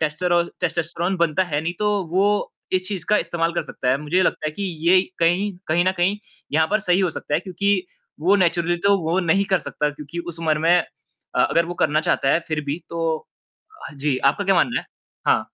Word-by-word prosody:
टेस्टरोल 170 +3 +1
testosterone 170 +2 -1
बनता 170 +1 +2
है 150 -4 -2
नहीं 165 +2 -2
तो 210 0 +1 0.2
वो 190 +3 +3 0.5
इस 185 0 +1
चीज़ 190 -5 -4
का 210 - +5
इस्तेमाल 165 0 -1
कर 170 - -1
सकता 125 - -5
है। 130 - +3
मुझे 150 +3 -2
ये 185 - +5
लगता 160 - 0
है - - 0
कि 200 - -6 0.3
ये 185 +1 +7 0.2
कहीं 175 +5 +2 0.2
कहीं 170 +3 +2
न 185 - +2
कहीं 180 +4 +2 0.4
यहाँ 160 +1 +3
पर 215 - +3
सही 185 -3 +2
हो 185 -3 +2
सकता 145 - -4
है 160 - +2
क्योंकि 195 +1 0 0.4
वो 190 +5 +4
नेचुरली 175 -2 +2
तो 200 0 +5
वो 165 +3 0
नहीं 185 +3 +2
कर 190 - +4
सकता। 150 -3 -2
क्योंकि 150 +3 -9
उस 170 -1 -6
उम्र 155 -2 +1
में 165 +3 +4 0.6
अ, - - +2
अगर 170 - +2
वो 175 - -5
करना 155 +1 +3
चाहता 135 - +1
है 165 - +3
फिर 155 -1 -1
भी 145 +3 -2
तो 165 -1 -2 0.8
अ, - - -14
जी। 140 -1 -1
आपका 145 +9 +1
क्या 195 0 +3
मानना 235 +8 +2
है? - - -16 0.4
हाँ। - - +3
170 Hz, 225 wpm, -22 LUFS, 155-185 Hz, 0.8 s, ये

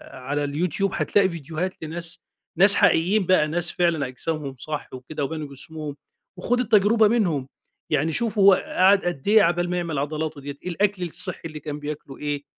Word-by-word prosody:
على 145 +3 -3
اليوتيوب 175 +6 -1
هتلاقي 195 -2 +2
فيديوهات 170 +2 -4
لناس 165 +1 -3 0.3
ناس 195 +3 +8
حقيقيين 190 +4 +3
بقى 175 -4 +3
ناس 175 +2 +1
فعلًا 170 -5 0
أجسامهم 140 +1 -5
صح 150 +3 -5
وكده 130 +3 -6
وبنوا 155 0 -5
جسمهم، 150 +1 -2 0.4
وخُد 245 +7 0
التجربة 220 -1 +4
منهم، 170 - 0 0.4
يعني 155 +2 +1
شوف 230 0 -1
هو 195 0 +7
قعد 190 +1 +3
قد 175 -5 -4
إيه 215 +1 +6
عقبال 175 +1 +1
ما 180 - -1
يعمل 165 -5 -2
عضلاته 155 0 -3
ديّة، 140 0 -7
إيه 180 - -4
الأكل 195 +1 0
الصحي 180 +2 -2
اللي 155 -2 -7
كان 150 -1 -6
بياكله 145 -2 -7
إيه، 145 -1 -3
165 Hz, 170 wpm, -23 LUFS, 145-185 Hz, 0.4 s, ناس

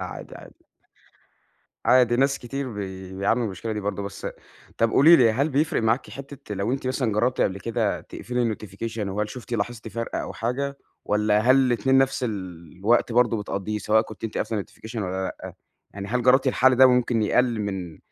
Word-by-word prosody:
عادي، - - -7
عادي. - - -16 1.2
عادي 125 -2 +5
ناس 135 +2 +2
كتير 130 0 -5
بي 95 -2 -7
بيعانوا 100 +5 +1
من - - 0
المشكلة 105 +3 -5
دي 105 - -3
برضه، 100 0 -3
بس 100 0 -8
أ - - -3 0.5
طَب 115 0 +3
قولي 160 +8 +7
لي 120 -5 +5
هل 135 +7 +1
بيفرِق 150 0 0
معاكِ 110 +3 0
حِتّة 135 -6 -8
لو 100 +6 -1
أنتِ 135 -1 -3
مثلًا 130 -3 0
جرّبتِ 120 +5 +1
قبْل 95 0 0
كده 115 0 -1
تقفلي 120 -2 -2
الnotification 110 +3 -7
وهل 105 +2 -2
شُفتِ، 125 0 -9
لاحظتِ 115 +1 -3
فَرق 115 +2 -4
أو - - -4
حاجة 140 +4 -3 0.3
والّا 105 0 +2
هل 130 +4 +5
الاتنين 130 0 +3
نفس 135 -1 +1
الوقت 95 +3 -1
برضه، 120 -1 +3
بتقضّيه 105 +1 -3
سواء 110 +2 +3
كنتِ 110 -2 -10
أنتِ 110 - -3
قافلة 110 -1 -1
الnotification 110 +4 -13
والّا 95 -2 -3
لأ، - - -8 0.4
يعني 100 0 -6
هل 125 +3 0
جرّبتِ 130 +2 +4
الحل 130 0 +4
ده 130 +1 +8
ممكن 125 -2 +2
يقلّل 120 +1 +2
من 95 -6 -4
115 Hz, 185 wpm, -24 LUFS, 105-125 Hz, 1.2 s, ده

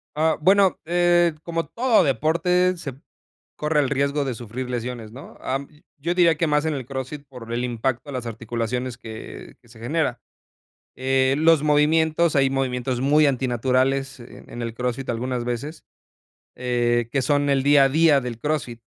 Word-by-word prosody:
Ah, 160 +1 +2
bueno, 190 +2 +4
eh, 175 -1 +3
como 165 -1 -3
todo 240 -1 +3
deporte, 180 +7 +2
se 140 -7 -7 0.6
corre 150 0 +1
el 135 - -1
riesgo 140 +1 0
de 135 -2 -2
sufrir 120 +2 -6
lesiones, 120 -2 -5
¿no?, 130 +5 -12
ah, 135 +1 -1
mm, 140 - -10 0.3
yo 165 +5 -2
diría 170 -2 +4
que 165 +2 0
más 150 0 +1
en 160 - 0
el 135 -4 -5
CrossFit 135 +2 -6
por 125 -4 -10
el 120 +1 -1
impacto 120 +2 -2
a - - -5
las 125 -2 -4
articulaciones 115 +2 -4
que 110 -1 -10
que - - -24
se 115 -1 -16
genera, 150 +8 -1 0.8
eh, 130 +1 +2
los 160 -1 +4
movimientos 155 +2 +2
hay 135 -2 +3
movimientos 125 -2 -1
muy 150 +3 +4
antinaturales 130 +1 0
en 120 - -13
en 120 - -6
el 115 -1 -4
Crossfit 125 +2 -3
algunas 120 +1 -2
veces, 125 +7 -5 0.7
eh, 120 -1 0
que 135 - +1
son 145 +1 +1
el 135 -1 +2
día 145 0 +6
a - - +2
día 155 0 +4
del 120 -2 -6
Crossfit. 135 -5 -2
135 Hz, 175 wpm, -23 LUFS, 125-155 Hz, 0.8 s, día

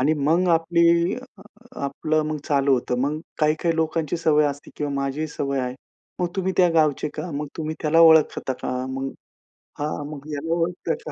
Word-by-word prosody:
आणि 150 +4 +3
मग 160 +5 +2
आपली 170 +1 +3
अ 250 -5 -12 0.4
आपलं 155 +3 0
मग 155 - -2
चालू 140 -1 +3
होतं. 125 0 -1
मग 145 +4 -1 0.2
काही-काही 155 +2 +1
लोकांची 160 0 0
सवय 155 -2 +3
असते 145 0 -5
किंवा 145 -1 -2
माझीही 140 +3 -2
सवय 140 -2 -2
आहे. 125 0 -3 0.5
मग 180 - +1
तुम्ही 190 0 0
त्या 180 -1 +5
गावचे 155 -2 +2
का? 180 - -5
मग 145 +1 -3
तुम्ही 155 0 -3
त्याला 160 +1 +4
ओळखता 160 -4 +5
का? - - -2 0.2
मग 135 +1 -3 0.7
हां, 150 0 -3
मग 145 -1 -9
याला 160 +3 -2
ओळखता 170 0 -1
का? 155 - -5
155 Hz, 180 wpm, -23 LUFS, 145-165 Hz, 0.7 s, त्या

